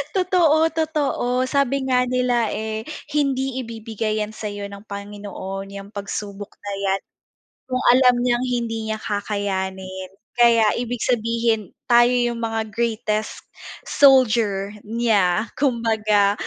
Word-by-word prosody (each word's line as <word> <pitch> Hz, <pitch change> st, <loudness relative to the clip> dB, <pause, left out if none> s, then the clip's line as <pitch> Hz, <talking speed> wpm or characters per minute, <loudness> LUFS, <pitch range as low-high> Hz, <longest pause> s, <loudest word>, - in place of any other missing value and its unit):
Totoo, 340 Hz, -4 st, +3 dB
totoo 295 Hz, -6 st, 0 dB
sabi 275 Hz, 0 st, +1 dB
nga 250 Hz, -1 st, +3 dB
nila, 250 Hz, -2 st, +1 dB
eh, 220 Hz, 0 st, -4 dB, 0.3 s
hindi 270 Hz, -3 st, 0 dB
ibibigay 220 Hz, -2 st, -3 dB
'yan 210 Hz, +1 st, -3 dB
sa'yo 205 Hz, -2 st, -6 dB
ng 200 Hz, +1 st, -11 dB
Panginoon 200 Hz, -1 st, -6 dB
yang 200 Hz, 0 st, -9 dB
pagsubok 200 Hz, 0 st, -6 dB
na 205 Hz, 0 st, -4 dB
'yan, 195 Hz, 0 st, +1 dB, 0.7 s
kung 255 Hz, 0 st, -1 dB
alam 250 Hz, -1 st, +5 dB
niyang 245 Hz, 0 st, +1 dB
hindi 230 Hz, -3 st, -2 dB
niya 220 Hz, -, -1 dB
kakayanin 190 Hz, -2 st, -3 dB, 0.2 s
kaya 230 Hz, -3 st, +5 dB
ibig 245 Hz, 0 st, -3 dB
sabihin 230 Hz, -3 st, 0 dB, 0.2 s
tayo 240 Hz, 0 st, +5 dB
yung 240 Hz, -1 st, 0 dB
mga 225 Hz, -1 st, -1 dB
greatest 220 Hz, -2 st, -2 dB, 0.4 s
soldier 220 Hz, -7 st, +4 dB
niya 215 Hz, -3 st, +1 dB
kumbaga. 220 Hz, -6 st, +2 dB
225 Hz, 115 wpm, -22 LUFS, 205-250 Hz, 0.7 s, alam